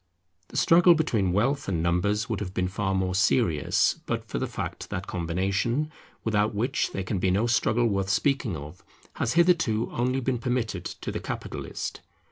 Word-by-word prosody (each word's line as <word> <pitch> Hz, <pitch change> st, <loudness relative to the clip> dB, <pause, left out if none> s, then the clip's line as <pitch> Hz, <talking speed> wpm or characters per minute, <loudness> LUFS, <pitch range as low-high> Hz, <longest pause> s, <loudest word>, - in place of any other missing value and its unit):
The -, -, -7 dB
struggle 175 Hz, +1 st, +6 dB
between 115 Hz, -, +1 dB
wealth 130 Hz, +9 st, +1 dB
and 85 Hz, -4 st, -1 dB
numbers 95 Hz, +5 st, +1 dB
would 110 Hz, -4 st, -2 dB
have 95 Hz, -2 st, -5 dB
been 90 Hz, 0 st, +1 dB
far 95 Hz, +1 st, -1 dB
more 95 Hz, -1 st, 0 dB
serious, 95 Hz, -, +2 dB
but -, -, -2 dB
for -, -, -3 dB
the -, -, -1 dB
fact -, -, -5 dB
that -, -, -4 dB
combination, 95 Hz, -, -1 dB, 0.3 s
without 105 Hz, -1 st, +1 dB
which 125 Hz, +6 st, 0 dB
there 95 Hz, -, -3 dB
can 95 Hz, +1 st, -2 dB
be 95 Hz, -, +1 dB
no 100 Hz, +5 st, +2 dB
struggle 120 Hz, 0 st, +2 dB
worth 95 Hz, -3 st, 0 dB
speaking 115 Hz, -, +1 dB
of, 75 Hz, +5 st, -10 dB, 0.3 s
has 115 Hz, -, 0 dB
hitherto 165 Hz, -11 st, +3 dB
only 125 Hz, +2 st, 0 dB
been 130 Hz, -1 st, -1 dB
permitted 115 Hz, -7 st, -2 dB
to -, -, -5 dB
the -, -, -3 dB
capitalist. -, -, -5 dB
105 Hz, 175 wpm, -26 LUFS, 95-125 Hz, 0.3 s, struggle